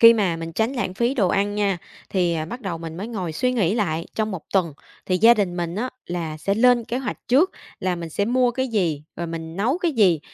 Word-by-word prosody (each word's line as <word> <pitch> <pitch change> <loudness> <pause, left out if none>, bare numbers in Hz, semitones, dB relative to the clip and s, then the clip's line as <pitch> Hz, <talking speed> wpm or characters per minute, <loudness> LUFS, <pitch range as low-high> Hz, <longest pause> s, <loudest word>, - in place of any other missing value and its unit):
Khi 230 0 +10
mà 190 -6 +1
mình 165 0 -6
tránh 220 +7 0
lãng 235 -8 -2
phí 235 +6 +1
đồ 200 -8 +2
ăn 205 +1 +1
nha, 200 -3 +1 0.3
thì, 175 -3 +1
ờ, 155 - -1
bắt 240 +8 -6
đầu 180 -7 -4
mình 165 0 -7
mới 205 +5 -5
ngồi 185 -8 -3
suy 250 +10 +1
nghĩ 205 -5 +2
lại 165 -7 -1
trong 215 0 0
một 185 -5 -5
tuần, 180 -5 +2 0.3
thì 185 -1 +1
gia 235 +4 +8
đình 190 -5 -1
mình 170 0 -2
á 245 +5 -2 0.2
là 165 -3 -3
sẽ 195 +6 0
lên 240 +1 +4
kế 245 +3 -2
hoạch 260 - -4
trước, 295 +10 +5 0.3
là 185 -1 0
mình 170 -1 -5
sẽ 200 +6 -1
mua 245 +2 +3
cái 260 +2 -2
gì, 170 -10 0
rồi 170 - -3
mình 165 0 -6
nấu 250 - +1
cái 345 -3 0
gì. 190 - +4
195 Hz, 255 wpm, -23 LUFS, 170-235 Hz, 0.3 s, Khi